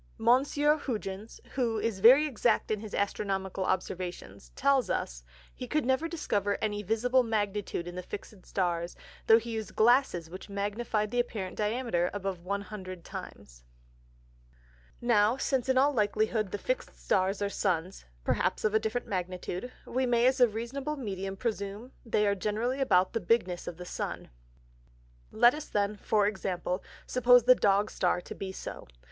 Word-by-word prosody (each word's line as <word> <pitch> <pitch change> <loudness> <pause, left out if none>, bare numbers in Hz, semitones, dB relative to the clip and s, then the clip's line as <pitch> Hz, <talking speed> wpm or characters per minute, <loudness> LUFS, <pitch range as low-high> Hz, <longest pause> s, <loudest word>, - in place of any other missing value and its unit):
Monsieur 290 +4 +3
Hugens 215 -5 -5
(who 235 -4 0
is 215 -2 -1
very 255 +9 +8
exact 240 -6 +1
in 215 - 0
his 215 -1 -7
Astronomical 195 -2 -1
Observations) 185 0 -4
tells 270 -5 +2
us, - - -2 0.3
he 250 - -7
could 300 +1 0
never 265 +5 +1
discover 205 - -1
any 210 -1 -1
visible 230 +5 +2
Magnitude 205 -6 -2
in 175 - -6
the 180 - -5
fix'd 200 +1 -9
Stars, 175 -2 -2 0.3
though 225 - +8
he 230 +1 -4
used 220 -3 -5
Glasses 225 -7 +3
which 185 +5 -10
magnified 210 +1 -2
the 245 - 0
apparent 210 -6 -2
Diameter 210 -5 0
above 195 -2 -3
100 190 -1 -6
times. - - -9 1.4
Now, 230 0 +3
since 265 -2 0
in 260 - +3
all 280 +2 +4
likelyhood 215 -1 +1
the 205 - -3
fix'd - - -3
Stars 195 +1 0
are 205 - 0
Suns, 185 -2 -2 0.2
(perhaps - - 0
of 215 - +2
a 220 - +4
different 220 +3 -2
Magnitude) 185 +4 -4
we 260 +1 -1
may 240 0 +3
as 260 +1 +3
a 245 - +7
reasonable 250 +7 -4
Medium 195 -5 -4
presume 210 +2 -4
they 215 -3 +1
are 200 - +3
generally 215 +6 -1
about 185 -8 +3
the 230 - 0
bigness 180 -3 0
of 165 - -5
the 180 - -8
Sun. - - -5 1.0
Let 240 +1 +5
us 300 0 -6
then 205 0 0
(for 205 +1 +2
Example) 185 -2 -2 0.2
suppose 245 -1 +5
the 255 +2 +8
Dog 205 -3 +2
Star 180 0 +1
to - - -8
be 190 -1 -5
so. - - -8
210 Hz, 160 wpm, -30 LUFS, 190-245 Hz, 1.4 s, very